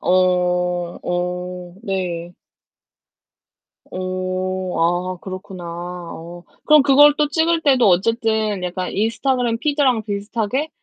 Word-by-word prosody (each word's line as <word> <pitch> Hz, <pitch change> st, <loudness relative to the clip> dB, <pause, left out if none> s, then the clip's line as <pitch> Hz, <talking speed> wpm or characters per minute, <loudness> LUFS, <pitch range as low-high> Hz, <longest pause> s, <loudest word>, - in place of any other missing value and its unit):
어. -, -, -1 dB, 0.9 s
어. 180 Hz, 0 st, -4 dB
네. 180 Hz, -4 st, -3 dB, 1.6 s
어. 185 Hz, 0 st, -3 dB
아 175 Hz, +2 st, 0 dB
그렇구나. 185 Hz, -1 st, -8 dB
어 175 Hz, 0 st, -7 dB, 0.2 s
그럼 305 Hz, -2 st, +6 dB
그걸 290 Hz, +1 st, +7 dB
또 300 Hz, -1 st, +2 dB
찍을 325 Hz, +2 st, +1 dB
때도 265 Hz, -7 st, +4 dB
어쨌든 215 Hz, +1 st, +1 dB
약간 180 Hz, +1 st, -3 dB
인스타그램 235 Hz, +2 st, 0 dB
피드랑 275 Hz, -6 st, +1 dB
비슷하게 220 Hz, +7 st, -2 dB
190 Hz, 200 characters per minute, -20 LUFS, 180-245 Hz, 1.6 s, 그걸